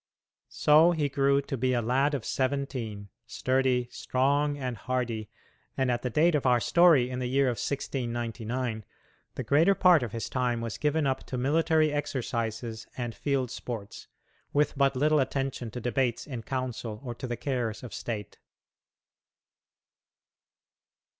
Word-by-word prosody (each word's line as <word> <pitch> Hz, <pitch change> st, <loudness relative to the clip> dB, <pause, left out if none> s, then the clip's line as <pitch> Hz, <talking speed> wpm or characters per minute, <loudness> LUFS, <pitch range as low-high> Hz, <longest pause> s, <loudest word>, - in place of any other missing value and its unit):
So 155 Hz, +4 st, +5 dB
he 150 Hz, -3 st, 0 dB
grew 140 Hz, 0 st, +2 dB
to 135 Hz, -, -4 dB
be 130 Hz, +1 st, +1 dB
a 120 Hz, -, +1 dB
lad 135 Hz, +5 st, +2 dB
of 130 Hz, -, -5 dB
seventeen, 130 Hz, -7 st, -2 dB, 0.2 s
sturdy, 130 Hz, -1 st, +1 dB
strong, 145 Hz, +3 st, +1 dB
and 130 Hz, -3 st, -3 dB
hardy, 115 Hz, -2 st, -3 dB, 0.5 s
and 130 Hz, -2 st, +2 dB
at 120 Hz, -, -1 dB
the 125 Hz, -, -2 dB
date 160 Hz, +8 st, +3 dB
of 145 Hz, -3 st, +1 dB
our 125 Hz, -1 st, +4 dB
story, 155 Hz, -4 st, +4 dB
in 125 Hz, -, -3 dB
the 125 Hz, -, -2 dB
year 135 Hz, +2 st, +3 dB
of 125 Hz, -3 st, 0 dB
1699, 120 Hz, -3 st, -3 dB, 0.5 s
the -, -, -3 dB
greater 165 Hz, +8 st, +4 dB
part 180 Hz, -5 st, +5 dB
of 120 Hz, -4 st, -3 dB
his 115 Hz, 0 st, -4 dB
time 125 Hz, -1 st, 0 dB
was 115 Hz, -2 st, -5 dB
given 150 Hz, 0 st, +1 dB
up 135 Hz, -1 st, 0 dB
to 130 Hz, -, -4 dB
military 155 Hz, +3 st, +2 dB
exercises 115 Hz, -5 st, -3 dB
and 120 Hz, -2 st, -3 dB
field 135 Hz, -3 st, -1 dB
sports, 115 Hz, -5 st, -7 dB, 0.5 s
with 150 Hz, +1 st, +2 dB
but 135 Hz, -1 st, +2 dB
little 150 Hz, +3 st, +3 dB
attention 135 Hz, -2 st, -2 dB
to 125 Hz, -, -6 dB
debates 120 Hz, 0 st, -1 dB
in 125 Hz, -5 st, -6 dB
council 120 Hz, -3 st, -4 dB
or 120 Hz, -3 st, -4 dB
to 130 Hz, -, -6 dB
the 120 Hz, -1 st, -3 dB
cares 125 Hz, -6 st, -2 dB
of 125 Hz, -, -8 dB
state. 105 Hz, -3 st, -5 dB
130 Hz, 155 wpm, -28 LUFS, 120-140 Hz, 0.5 s, So